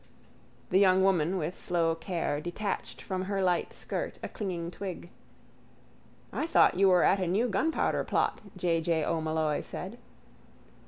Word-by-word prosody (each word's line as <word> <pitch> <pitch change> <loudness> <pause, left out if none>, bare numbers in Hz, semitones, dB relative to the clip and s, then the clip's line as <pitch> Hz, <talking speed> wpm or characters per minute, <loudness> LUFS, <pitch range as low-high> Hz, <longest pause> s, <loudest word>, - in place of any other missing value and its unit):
The 185 - +5
young 190 -1 +5
woman 185 -1 +2
with 165 +1 -3
slow 170 -2 +1
care 165 -3 -2
detached 185 +5 -4
from 185 -1 -3
her 200 0 -2
light 180 -2 +1
skirt - - -4
a - - -4
clinging 175 -5 -4
twig. 180 -1 -7 1.2
—I 315 - -1
thought 335 - +5
you 195 +2 +4
were 180 -1 +5
at 195 - +4
a 185 - 0
new 205 +8 +2
gunpowder 245 +10 +1
plot, - - 0 0.2
J. 170 -2 +1
J. 160 -2 +1
O'Molloy 160 -2 0
said. 210 +7 -7
180 Hz, 150 wpm, -29 LUFS, 165-195 Hz, 1.2 s, The